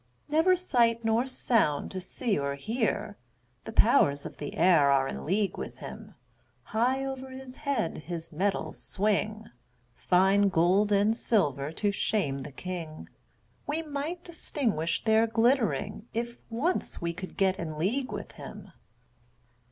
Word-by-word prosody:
Never 320 +5 +4
sight 235 -10 +2
nor 225 +3 +2
sound 225 - +1
to 185 - -4
see 205 +4 -1
or 140 -1 -1
hear; 215 - -2 0.5
The - - -5
powers 210 - +4
of - - -8
the 145 - -6
air 165 -5 +5
are 135 -1 +3
in - - -6
league 195 +3 0
with - - -6
him; - - -9 0.5
High 255 +4 0
over 265 -1 -5
his 260 0 -9
head 275 - -1
his 165 +2 -6
metals 195 +5 -2
swing, 215 +2 -1 0.4
Fine 195 +7 +3
gold 185 +4 +3
and 205 +2 +3
silver 150 - +1
to 205 +4 0
shame 195 -9 0
the 145 +2 -7
king; 165 0 -6 0.6
We 310 +3 -1
might 310 +4 -4
distinguish 225 - -2
their 220 0 +4
glittering, 225 -2 +1
If 235 +1 -3
once 270 +11 -1
we 170 0 -2
could 185 +2 -8
get 190 -1 +2
in 155 -2 -4
league 240 - -1
with - - -6
him. - - -10
210 Hz, 145 wpm, -29 LUFS, 170-245 Hz, 0.6 s, air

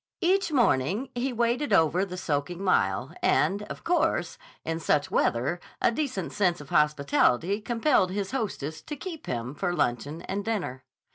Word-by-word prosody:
Each 375 0 +2
morning 215 - +2
he 250 +2 -1
waded 240 +4 0
over 165 +3 +4
the 180 -1 -7
soaking 170 +2 -2
mile, 185 - +1
and, 200 +2 +2
of - - -7
course, 350 +1 0 0.3
in 165 0 -2
such 150 -3 +1
weather 130 +9 +1 0.2
a - - +3
decent 240 - -3
sense 185 -4 +1
of 150 - -11
hospitality 150 - +2
compelled 235 -3 +2
his 195 0 -3
hostess 190 - -3
to 300 - -6
keep 325 +2 -8
him 120 +1 -3
for 175 +2 -2
luncheon 145 +4 -1
and 200 +1 -3
dinner. 180 - -3
190 Hz, 155 wpm, -27 LUFS, 150-240 Hz, 0.3 s, over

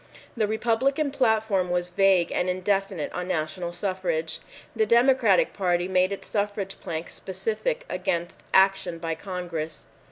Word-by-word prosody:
The 220 -3 +1
Republican 255 +7 +1
platform 220 -8 +2
was 175 0 0
vague 190 -2 +3
and 180 - 0
indefinite 190 -2 -1
on 180 0 -3
national 170 0 -2
suffrage. 175 -4 -2 0.4
The 220 -1 +2
Democratic 235 -4 +4
Party 175 -2 +1
made 185 0 +2
its 200 - -6
suffrage 205 -2 -2
plank 165 0 -4
specific 225 - -3
against 170 0 -2
action 190 -3 +3
by 165 0 -3
Congress. 170 -3 -5
190 Hz, 130 wpm, -26 LUFS, 175-215 Hz, 0.4 s, Democratic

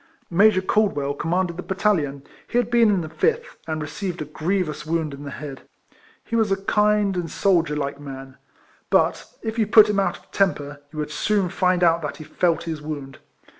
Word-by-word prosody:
Major 190 +1 +5
Caldwell 185 -10 +1
commanded 170 +3 -1
the - - -3
battalion; 175 -9 0 0.2
he 240 - -1
had 240 -1 +1
been 235 -2 +5
in 195 -3 +2
the 155 - -6
fifth, 470 - -1
and 155 -1 -2
received 175 +4 -5
a 155 - -3
grievous 155 0 -2
wound 160 -1 -1
in 140 +1 -9
the - - -5
head. 140 -1 -7 0.6
He 230 - -4
was 220 -3 +2
a 195 - +3
kind 210 0 +2
and 175 -2 -2
soldier 170 -6 +2
like 140 -1 -3
man, 135 -2 -9 0.5
but - - +1
if 225 0 -3
you 215 - +2
put 215 0 +7
him 200 - +1
out 195 - 0
of - - -25
temper, 145 -7 0
you 155 - -11
would 150 0 -3
soon 195 +4 +1
find 180 -1 +1
out 170 -1 +4
that 150 - -4
he 155 - -8
felt 170 +2 0
his 160 -2 -5
wound. 145 -3 -6
170 Hz, 200 wpm, -23 LUFS, 150-200 Hz, 0.6 s, put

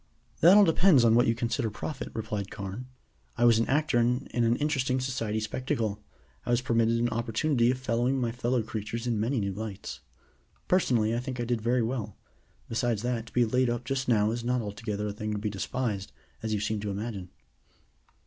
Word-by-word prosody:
"That 180 +6 +8
all 210 - +8
depends 165 -5 +5
upon 115 -1 +5
what 120 +1 +4
you 115 - +2
consider 120 0 -1
profit," 145 +8 -5
replied 105 -3 -3
Carne. 100 +6 -6 0.5
"I 120 - +3
was 115 -2 +6
an 115 - +1
actor 145 -3 +2
in 125 +3 +1
an 120 -1 +2
interesting 135 -3 0
Society 120 -4 -2
spectacle. 110 -2 -2 0.4
I - - -8
was 120 -1 +3
permitted 115 -2 +2
an 120 +1 +1
opportunity 120 +2 +1
of 125 - +1
observing 125 +2 0
my 120 -2 0
fellow 120 0 0
creatures 110 +2 -5
in 115 -3 0
many 120 +4 0
new 100 -2 -2
lights. 105 -1 -6 0.7
Personally, 120 -12 +2
I - - 0
think 125 0 -5
I 120 - -1
did 120 -1 -1
very 120 +2 +2
well. 115 -4 -3 0.5
Besides 115 -1 -1
that, 120 -2 -2
to - - -14
be 120 -1 +4
laid 125 +2 +2
up 120 0 -2
just 135 +1 -2
now 110 -3 +3
is 120 0 -3
not 125 +1 +1
altogether 105 -1 -4
a 105 - -3
thing 105 +1 -4
to - - -2
be 105 0 -2
despised, 100 -1 -3 0.3
as 110 - -3
you 105 - 0
seem 105 +1 -1
to 105 0 -4
imagine." 100 -2 -5
115 Hz, 200 wpm, -28 LUFS, 110-125 Hz, 0.7 s, That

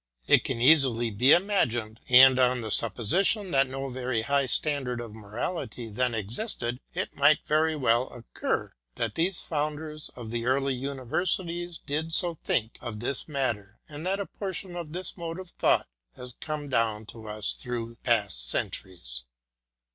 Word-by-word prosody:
It - - +5
can - - -2
easily 125 -4 +4
be 125 +7 +4
imagined, 120 - +2
and 130 +1 +8
on 125 -1 +3
the 110 -1 -5
supposition 180 - +4
that 135 -2 +3
no 135 +1 -5
very 125 -3 -2
high 140 +1 +1
standard 130 -3 -1
of 115 -3 -7
mo 110 -2 -12
rality 120 - -5
then 125 +1 0
existed 120 - -3 0.2
it - - -3
might 145 +2 +4
very 155 +1 +1
naturally 125 -1 +1
occur, 120 - -3 0.2
that 115 -2 -2
these 175 +3 0
founders 150 0 -3
of 115 -3 -8
the 120 0 -3
early 135 +1 +1
universities 170 +7 -2
did 155 +3 -2
so 175 -3 +5
think 110 -1 -1
of 110 -3 -6
this 125 +4 -1
mat 135 -7 -1
ter, 100 +1 -21
and 150 +1 -9
that 195 +1 0
a 200 - -2
portion 190 -2 -6
of 170 -3 -6
this 180 +3 -3
mode 165 0 -5
of 185 -2 -10
thought - - +2 0.3
has 125 -1 -10
come 150 -2 -5
down 115 -4 0
to 110 +1 -11
us 105 0 -1
through 115 -2 -6
past 100 - +1
centuries. - - 0
130 Hz, 165 wpm, -27 LUFS, 115-155 Hz, 0.3 s, and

